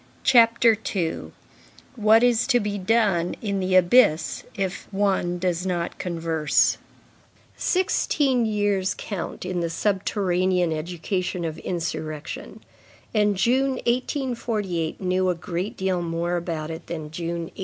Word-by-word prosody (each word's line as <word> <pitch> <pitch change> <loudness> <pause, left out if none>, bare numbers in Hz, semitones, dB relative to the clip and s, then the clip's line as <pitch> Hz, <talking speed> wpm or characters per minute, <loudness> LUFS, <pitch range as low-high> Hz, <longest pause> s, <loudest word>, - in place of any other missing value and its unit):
CHAPTER 235 -2 +5 0.2
II—WHAT 215 +5 -1
IS 245 -1 +3
TO 245 -3 +4
BE 205 -1 -3
DONE 190 -4 +1
IN 200 -3 -2
THE 185 0 0
ABYSS 180 -2 +4
IF 190 -2 -3
ONE 195 -3 0
DOES 175 -1 -1
NOT 175 -2 -2
CONVERSE 165 -4 +1 0.8
Sixteen 280 -9 +1
years 205 -3 0
count 190 -3 -5
in 180 -1 -2
the 170 -1 -1
subterranean 185 -1 0
education 175 +2 -3
of 160 0 -4
insurrection, 155 -3 -5 0.5
and 210 -2 +2
June, 260 +7 +2
1848, 235 - -2
knew 185 0 +1
a 180 - +1
great 175 +3 -4
deal 190 -2 0
more 170 +1 -2
about 165 -2 -3
it 160 +1 -8
than 155 -3 -6
June, 170 +1 -3
1832. - - -17
185 Hz, 125 wpm, -24 LUFS, 170-215 Hz, 0.8 s, CHAPTER